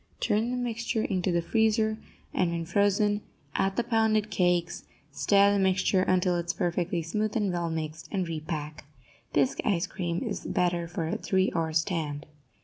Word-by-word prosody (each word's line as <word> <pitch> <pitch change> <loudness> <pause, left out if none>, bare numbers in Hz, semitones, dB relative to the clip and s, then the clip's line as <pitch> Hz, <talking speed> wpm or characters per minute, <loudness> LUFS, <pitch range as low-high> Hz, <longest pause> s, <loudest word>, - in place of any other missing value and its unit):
Turn 220 +3 +1
the 250 - -2
mixture 230 -2 -1
into 185 -2 0
the 170 -1 +1
freezer, 220 +2 +2 0.3
and, 180 - +2
when 170 -1 -3
frozen, 205 +3 +2 0.3
add 195 0 0
the 240 - +1
pounded 220 -2 +1
cakes; 175 -2 +1 0.3
stir 200 +8 +4
the 200 - +2
mixture 190 0 +2
until 185 -1 +2
it 170 0 -3
is 170 - 0
perfectly 175 0 -1
smooth 210 +6 -2
and 205 -4 0
well 170 -1 -1
mixed, 160 0 -4
and 190 -4 -1
repack. 155 -2 -5 0.5
Bisque 140 -3 +1
ice 190 -4 +1
cream 175 -2 -3
is - - -4
better 175 -1 0
for 165 -1 -3
a - - -2
three 190 0 +1
hour 165 -1 0
stand. 155 -3 -1
180 Hz, 170 wpm, -28 LUFS, 170-205 Hz, 0.5 s, stir